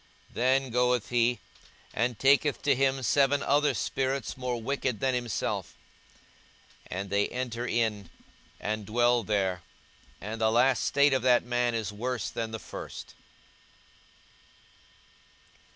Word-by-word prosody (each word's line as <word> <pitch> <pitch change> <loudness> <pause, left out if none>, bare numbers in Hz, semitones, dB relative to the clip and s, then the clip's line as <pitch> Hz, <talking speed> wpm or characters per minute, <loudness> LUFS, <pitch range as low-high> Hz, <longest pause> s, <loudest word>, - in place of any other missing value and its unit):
42:011:026 - - -24
Then 130 +2 +2
goeth 125 -1 +1
he, 120 -1 +2 0.5
and 120 0 0
taketh 140 +3 +3
to 145 - +4
him 135 0 +1
seven 140 +2 +3
other 145 +1 +2
spirits 135 0 -2
more 125 -2 -3
wicked 130 -2 -2
than 130 -1 +1
himself; 120 -3 -3 1.1
and 95 +1 -5
they 100 0 +2
enter 125 -1 -4
in, 110 -5 -1 0.5
and 105 -1 -3
dwell 120 +2 +3
there: 95 -4 -1 0.6
and 110 +3 -6
the 110 - +4
last 125 +2 +3
state 140 0 +4
of 130 - +1
that 125 0 +4
man 120 -1 0
is 110 -3 -3
worse 125 +3 -3
than 115 -1 -3
the 110 - -5
first. - - -9
120 Hz, 130 wpm, -28 LUFS, 110-130 Hz, 1.1 s, to